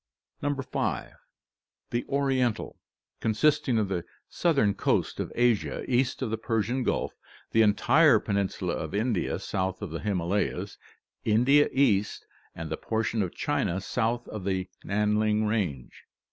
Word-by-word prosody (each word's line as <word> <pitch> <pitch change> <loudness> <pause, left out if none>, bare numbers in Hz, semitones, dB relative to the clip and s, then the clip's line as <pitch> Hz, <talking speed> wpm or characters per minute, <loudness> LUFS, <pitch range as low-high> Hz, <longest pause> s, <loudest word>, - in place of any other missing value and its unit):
5. 145 -1 -1
Hie 120 +1 -5
Oriental, 130 -5 0 0.4
consisting 130 +3 +2
of 105 -2 +1
the 90 -3 -2 0.2
southern 140 - +2
coast - - 0
of - - -3
Asia 120 -3 +1
east 130 +1 +1
of 115 - -2
the 110 - -2
Persian 115 +3 0
Gulf, - - -1 0.4
the 115 - +4
entire 120 +5 +5
peninsula 100 -4 -1
of 80 +2 -4
India 110 -2 0
south 95 -1 -2
of 100 -6 -6
the 80 - -4
Himalayas, 100 -1 -1 0.4
India 125 +7 +4
East, 105 -7 +1 0.3
and 80 -1 -6
the 80 - -1
portion 110 0 -1
of 90 -3 -3
China 90 - 0
south 120 +4 -1
of 105 -3 -6
the 95 -1 -1 0.2
Nan 105 +1 +1
ling 110 0 +2
Range. 95 - -2
110 Hz, 135 wpm, -28 LUFS, 100-125 Hz, 0.4 s, entire